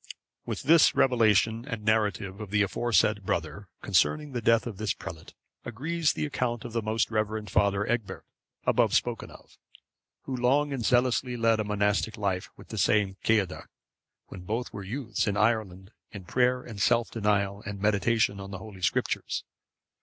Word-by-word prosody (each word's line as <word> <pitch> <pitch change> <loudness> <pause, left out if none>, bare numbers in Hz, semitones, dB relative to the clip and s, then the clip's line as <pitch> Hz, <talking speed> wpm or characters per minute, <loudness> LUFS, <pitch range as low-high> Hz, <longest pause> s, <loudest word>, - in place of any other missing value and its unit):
With - - -4
this 160 +2 +5
revelation 115 -2 +3
and 115 -6 -5
narrative 105 -2 0
of 105 - -7
the 105 +1 +2
aforesaid 105 -1 +1
brother, 95 +3 -3
concerning 145 - +1
the 120 -2 -3
death 115 0 +3
of 115 -5 -6
this 105 -1 -1
prelate, 80 -2 -10 0.3
agrees 150 +7 -1
the - - -2
account 120 -5 -2
of 120 - -7
the 115 - 0
most 110 +1 -1
reverend 110 -2 -2
Father 100 0 +2
Egbert, 115 -3 -3 0.4
above - - +3
spoken - - -1
of,(552) - - -16 0.7
who 135 - -4
long 140 +4 +2
and 130 -4 -3
zealously 125 +1 +1
led 115 -1 +2
a - - +1
monastic 105 +1 0
life 95 -3 -2
with - - -15
the - - -4
same 100 -3 +2
Ceadda, 105 -5 0 0.6
when 90 - -10
both 110 +7 -4
were 100 - -6
youths, 115 +2 -3
in 100 -1 0
Ireland, 105 -3 0 0.2
in 100 -4 -10
prayer 125 +5 +1
and 105 -4 -8
self 120 +2 +2
denial 105 -2 0
and 100 0 -5
meditation 105 0 +1
on 100 0 -7
the 95 - -6
Holy 95 -1 -11
Scriptures. 85 -1 -1
110 Hz, 170 wpm, -28 LUFS, 100-120 Hz, 0.7 s, this